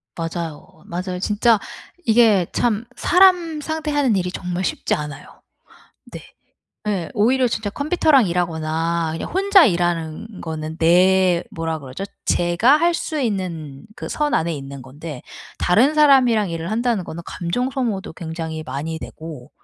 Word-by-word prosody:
맞아요, 165 0 -6
맞아요. 180 +1 -4
진짜 210 +2 +2 0.5
이게 220 -6 +4
참 230 -1 0
사람 350 -4 +4
상대하는 295 -6 0
일이 180 -1 -1
정말 180 0 -4
쉽지 - - -1
않아요. 150 -2 -8 0.7
네. - - -7 0.7
예 185 -5 -2
오히려 245 +4 +3
진짜 220 -2 -3
컴퓨터랑 285 - +3
일하거나 165 -1 -1
그냥 165 - -5
혼자 390 -1 +5
일하는 175 +2 -2
거는 160 -1 -5
내 180 +1 +4
뭐라 165 -1 -3
그러죠? 135 +8 -7 0.2
제가 175 +11 +3
할 340 +1 +2
수 310 -3 -3
있는 170 - -3
그 - - -6
선 295 -1 0
안에 165 +1 +1
있는 135 -1 -8
건데 145 +1 -9 0.4
다른 245 +12 +3
사람이랑 255 -9 +5
일을 165 +3 -4
한다는 230 -3 0
거는 170 +1 -7
감정 245 +10 -2
소모도 225 -9 -3
굉장히 160 -1 -5
많이 150 +5 -4
되고 155 -5 -9
180 Hz, 290 characters per minute, -21 LUFS, 165-240 Hz, 0.7 s, 혼자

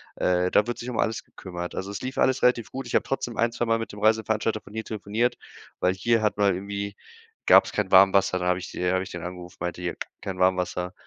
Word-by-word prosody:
Äh, 90 0 +1
da 105 - +4
wird 120 0 -4
sich 120 - -5
um 120 - -4
alles 115 +1 0
gekümmert. 90 -2 -7
Also, 95 +1 -4
es 100 - -6
lief 130 +1 -5
alles 130 0 +2
relativ 120 -3 +2
gut. 135 +1 -5
Ich - - -3
hab - - +4
trotzdem 125 -3 -3
ein, 115 0 +2
zweimal 115 -1 0
mit 115 - -5
dem 105 - -10
Reiseveranstalter 110 0 +1
von 100 - -15
hier 110 0 -3
telefoniert, 110 +3 -1 0.4
weil 90 - +2
hier 115 +3 +1
hat 105 -1 +1
man 100 -2 +3
irgendwie 100 +1 -5 0.5
gab's - - +6
kein 105 -3 -1
Warmwasser. 95 0 +6
Dann 90 - -2
habe 90 0 +2
ich 95 - -7
die 90 0 -1
habe 95 0 +1
ich - - -9
den 85 -1 -6
angerufen, 90 0 -8
meinte 90 0 -4
hier: 90 -1 -3 0.3
„Kein 95 -2 -5
Warmwasser,“ 90 -1 +1
100 Hz, 240 wpm, -25 LUFS, 90-115 Hz, 0.5 s, gab's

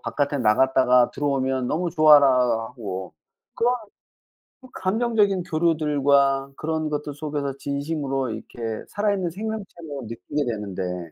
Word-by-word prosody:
바깥에 145 0 -1
나갔다가 125 +2 +4
들어오면 135 -3 -1
너무 170 +2 -1
좋아라 150 -3 +7 0.4
하고 95 - -7 0.4
그런 245 +2 +2 0.9
그 260 - -14
감정적인 205 -2 +1
교류들과 145 -5 +2
그런 155 0 -2
것들 150 -1 -3
속에서 145 -2 -3
진심으로 140 -2 -2
이렇게 115 0 -6
살아있는 200 -3 0
생명체로 190 - -6
느끼게 140 +6 -3
되는데 95 -6 -4
145 Hz, 310 characters per minute, -24 LUFS, 130-165 Hz, 0.9 s, 좋아라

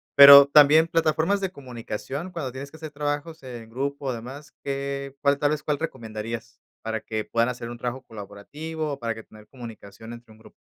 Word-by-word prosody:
Pero, 140 0 +11
también 150 +2 +6
plataformas 165 +4 +1
de 190 - -2
comunicación 130 - -7
cuando 145 -7 -5
tienes 135 +2 -8
que 160 - -13
hacer 155 -1 -8
trabajos 145 +2 -4
en 120 -3 -9
grupo 140 +3 -4
o 130 - 0
demás, 130 +5 -9
¿qué 140 0 -4
cuál, 140 0 +3
tal 145 -1 +2
vez, 150 -1 -2
cuál 150 -1 -1
recomendarías 115 -5 -6 0.2
para 110 -1 -3
que 110 -1 -4
puedan 115 +1 +1
hacer 120 -1 -6
un 120 - -8
trabajo 125 +2 -4
colaborativo 145 +10 -7
o - - -7
para 115 -1 -2
que 110 - -10
tener 105 -1 -17
comunicación 115 -3 -11
entre 120 -1 -13
un 110 - -17
grupo? 110 - -17
135 Hz, 195 wpm, -25 LUFS, 115-150 Hz, 0.2 s, Pero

